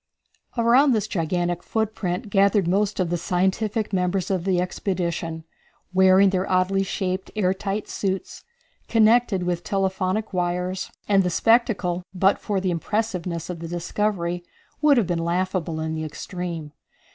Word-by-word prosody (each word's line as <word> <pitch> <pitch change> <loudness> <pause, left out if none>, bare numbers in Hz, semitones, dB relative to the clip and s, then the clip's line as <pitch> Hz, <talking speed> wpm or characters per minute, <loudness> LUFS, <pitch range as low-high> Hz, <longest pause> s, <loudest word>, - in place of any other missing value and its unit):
Around 245 +4 +5
this 215 -3 0
gigantic 175 0 -1
footprint 210 -3 -2
gathered 200 -2 +3
most 200 +3 +1
of 175 -2 0
the 175 - 0
scientific 200 +5 0
members 180 0 0
of 185 -2 -1
the 185 -2 +2
expedition, 175 -3 -2 0.5
wearing 190 +1 +6
their 190 0 -1
oddly 185 +1 +2
shaped 190 -1 -2
air 190 -3 +2
tight 195 +2 -3
suits, 190 -1 -3 0.4
connected 225 -3 +3
with 175 -1 -2
telephonic 195 +2 -1
wires, 180 +1 -1 0.2
and 200 -2 +4
the 180 - 0
spectacle, 205 -3 +2
but 190 +2 +3
for 205 -3 -1
the 185 -1 -1
impressiveness 180 -2 -2
of 180 -2 -5
the 165 - -6
discovery, 175 0 -2 0.4
would 295 -3 +5
have 230 - +3
been 170 -1 -1
laughable 175 -2 -1
in 160 0 -2
the 155 0 -3
extreme. 165 0 -5
185 Hz, 145 wpm, -24 LUFS, 175-200 Hz, 0.5 s, wearing